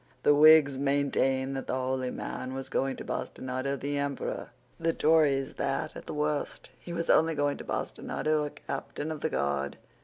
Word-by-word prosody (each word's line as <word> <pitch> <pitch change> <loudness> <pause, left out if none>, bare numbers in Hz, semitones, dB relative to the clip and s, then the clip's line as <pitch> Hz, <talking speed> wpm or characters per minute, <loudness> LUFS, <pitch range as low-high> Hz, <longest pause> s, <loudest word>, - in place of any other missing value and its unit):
The 145 - +6
Whigs 150 -2 +7
maintained 135 -1 +1
that 135 - -5
the - - -1
holy 130 0 -1
man 130 +1 -5
was 135 0 -5
going 135 0 0
to - - -8
bastinado 130 +1 -3
the 145 +1 -2
Emperor; 140 -1 -3 0.3
the 165 0 +1
Tories 150 -5 +3
that, - - -1
at - - -9
the - - -4
worst, 150 0 -2
he 175 - -9
was 170 -1 0
only 160 0 +4
going 145 -1 0
to - - -8
bastinado 155 0 -1
a 150 - -2
captain 145 +2 -5
of 155 -2 -5
the 160 - 0
guard. 70 - -1
140 Hz, 180 wpm, -29 LUFS, 130-150 Hz, 0.3 s, Whigs